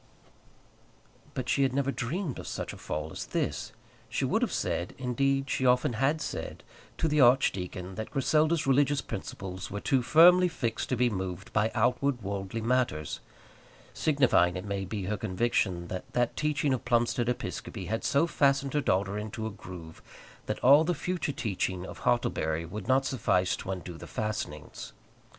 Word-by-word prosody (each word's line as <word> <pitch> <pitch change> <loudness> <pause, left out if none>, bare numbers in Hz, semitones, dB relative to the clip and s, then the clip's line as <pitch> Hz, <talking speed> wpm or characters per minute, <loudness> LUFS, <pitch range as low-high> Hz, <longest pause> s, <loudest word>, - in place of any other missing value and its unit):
But 130 -2 -3
she 140 - +2
had 135 -2 +2
never 140 0 +1
dreamed 140 +4 -3
of - - -8
such - - -4
a - - -10
fall 75 +1 -4
as - - -6
this! - - -2 0.4
She - - -1
would - - +1
have - - +1
said, 90 +3 -2
indeed, 135 +2 0
she 130 - -1
often 125 -1 +3
had 135 +7 +1
said, - - -5 0.3
to 160 - +1
the 150 -1 +3
archdeacon 95 -8 +2
that 110 +3 -5
Griselda's 155 +3 +2
religious 140 +1 +3
principles 95 -5 -6
were 105 - -4
too 130 +4 +2
firmly 175 +7 +7
fixed 120 -9 -3
to 130 - +1
be 125 0 +2
moved 95 -1 -5
by 105 +1 +2
outward 125 -1 +1
worldly 100 +2 -3
matters; 115 - 0 0.7
signifying, 130 - +3
it 90 - -6
may 100 -1 -2
be, 100 +1 -4
her 105 +3 -2
conviction 95 -3 0
that 95 - -6
that 120 -1 +1
teaching 150 -2 +1
of 130 - -2
Plumstead 120 0 +1
Episcopi 115 -4 -4
had 110 +3 -2
so 140 +4 +3
fastened 140 -3 +2
her 150 - +2
daughter 100 -3 0
into 110 +1 -5
a 110 - -3
groove, 90 -5 -10 0.5
that - - -1
all 140 +4 +8
the 175 +2 0
future 175 -1 -2
teaching 95 -7 -2
of - - -9
Hartlebury 80 +6 0
would 95 +4 -7
not 135 +1 +3
suffice 95 -9 +1
to - - -8
undo 90 -3 -5
the - - -9
fastenings. 105 -9 -5
120 Hz, 170 wpm, -29 LUFS, 95-140 Hz, 0.7 s, all